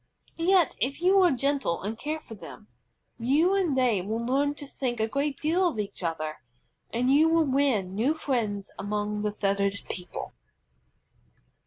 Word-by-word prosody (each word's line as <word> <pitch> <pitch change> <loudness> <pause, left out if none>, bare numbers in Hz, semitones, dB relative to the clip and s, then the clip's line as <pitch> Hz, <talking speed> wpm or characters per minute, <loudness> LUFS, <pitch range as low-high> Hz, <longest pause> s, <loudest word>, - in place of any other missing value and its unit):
Yet 355 -1 +3
if 270 +6 -1
you 380 +3 +5
are 360 - +6
gentle 275 - 0
and 210 +3 -3
care 305 +7 -3
for 230 - -12
them, 210 0 -11 0.5
you 295 +10 +3
and 360 -9 +1
they 240 -7 +3
will 215 +5 -3
learn 275 +5 0
to 290 - -9
think 250 -4 -3
a 220 - +1
great 280 +3 -1
deal 350 +4 +2
of 320 - -3
each 205 -2 -4
other, 155 -2 -3 0.5
and 250 +3 +1
you 310 +3 +5
will 325 -1 +4
win 260 -9 +1
new 245 +10 +1
friends 220 -10 -2
among 210 +1 -2
the 210 0 0
feathered 200 -1 0 0.2
people. 180 -1 -7
255 Hz, 165 wpm, -27 LUFS, 210-295 Hz, 0.5 s, are